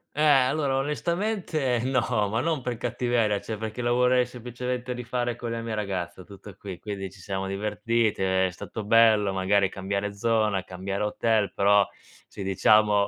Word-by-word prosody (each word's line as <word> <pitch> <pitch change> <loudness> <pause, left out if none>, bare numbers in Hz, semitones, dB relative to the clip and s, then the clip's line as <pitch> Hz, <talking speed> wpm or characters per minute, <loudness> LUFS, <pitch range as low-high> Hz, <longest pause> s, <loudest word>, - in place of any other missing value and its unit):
Eh, 150 - -1
allora 140 -1 +3
onestamente 155 - -1
no, 120 -5 +1
ma 110 +3 0
non 155 +1 0
per 125 -2 -3
cattiveria, 120 -3 0
cioè 110 - -5
perché 110 +2 -5
la 120 - 0
vorrei 125 0 +3
semplicemente 125 +1 -5
rifare 120 0 -2
con 120 0 -5
la 115 0 -3
mia 115 -1 -4
ragazza 95 -4 -4
tutto 100 0 -12
qui. 95 -3 -8
Quindi 100 0 -5
ci 95 - -17
siamo 95 +1 -4
divertiti, 105 +2 0
è 95 0 +2
stato 105 +4 -7
bello 110 -2 +4
magari 95 +1 +2
cambiare 100 +1 -3
zona, 110 -3 +1
cambiare 95 +2 -5
hotel, 105 0 +1
però 100 +1 +4 0.4
sì, 100 - -8
diciamo 105 +2 +4
110 Hz, 160 wpm, -26 LUFS, 100-125 Hz, 0.4 s, bello